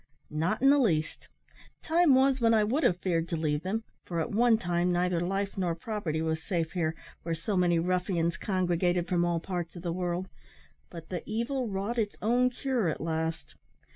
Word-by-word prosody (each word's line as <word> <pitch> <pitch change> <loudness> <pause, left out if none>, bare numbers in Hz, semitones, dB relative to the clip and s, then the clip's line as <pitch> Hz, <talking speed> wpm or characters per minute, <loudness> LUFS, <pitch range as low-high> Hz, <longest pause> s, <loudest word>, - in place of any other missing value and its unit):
"Not 170 - -1
in 275 - +7
the 290 - +5
least. 160 - 0 0.6
Time 330 -4 +4
was 265 0 +3
when 230 -1 +4
I 215 - +4
would 250 +9 +1
have 180 - +3
feared 170 -3 0
to 170 - -1
leave 150 -2 0
them; 205 +6 -2 0.2
for 170 -2 -3
at 200 - -2
one 230 +1 +4
time 175 -2 0
neither 175 0 +1
life 195 +3 -2
nor 175 -3 0
property 170 -4 -3
was 160 0 -1
safe 165 -3 -2
here, 165 -3 -1 0.3
where 165 0 -2
so 180 +5 -3
many 175 -2 +3
ruffians 175 -1 0
congregated 180 -2 0
from 175 -1 +1
all 170 -1 +1
parts 175 -1 -4
of 175 - -9
the 170 -2 -2
world; 180 +1 -2 0.6
but 165 -2 -10
the 180 -2 -3
evil 235 +4 -1
wrought 205 +4 -2
its 210 -2 -1
own 245 +4 +3
cure 250 -6 -1
at 155 - -3
last. 160 0 -3
180 Hz, 195 wpm, -29 LUFS, 165-220 Hz, 0.6 s, in